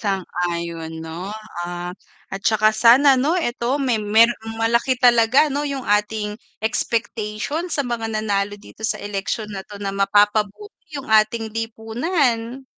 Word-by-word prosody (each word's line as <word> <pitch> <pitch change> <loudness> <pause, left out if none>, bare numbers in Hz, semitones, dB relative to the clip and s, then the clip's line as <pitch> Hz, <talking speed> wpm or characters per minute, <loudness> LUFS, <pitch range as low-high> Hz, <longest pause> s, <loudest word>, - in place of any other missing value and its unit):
Sang-ayon, 170 -4 -3
'no? 165 +4 -6 0.3
Ah, 175 0 -5 0.4
at 195 - -4
tsaka 215 0 +3
sana, 250 +5 +6
'no, 295 +8 +1
eto 255 -3 -1
may 250 -5 0
merong 225 +1 +2
malaki 235 +3 +1
talaga, 245 +3 +5
no, 285 +2 -1
'yung 275 -3 -4
ating 210 0 0 0.2
expectation 225 +8 -2
sa 285 -4 0
mga 230 -2 -3
nanalo 205 -2 -1
dito 210 +1 -15
sa 215 -1 0
eleksyon 205 +1 -4
na 190 - -5
'to 205 -1 -11
na 195 -1 -4
mapapabuti 205 - +1 0.2
yung 265 - -8
ating 220 +1 +3
lipunan. 230 +3 -1
220 Hz, 135 wpm, -21 LUFS, 205-240 Hz, 0.4 s, sana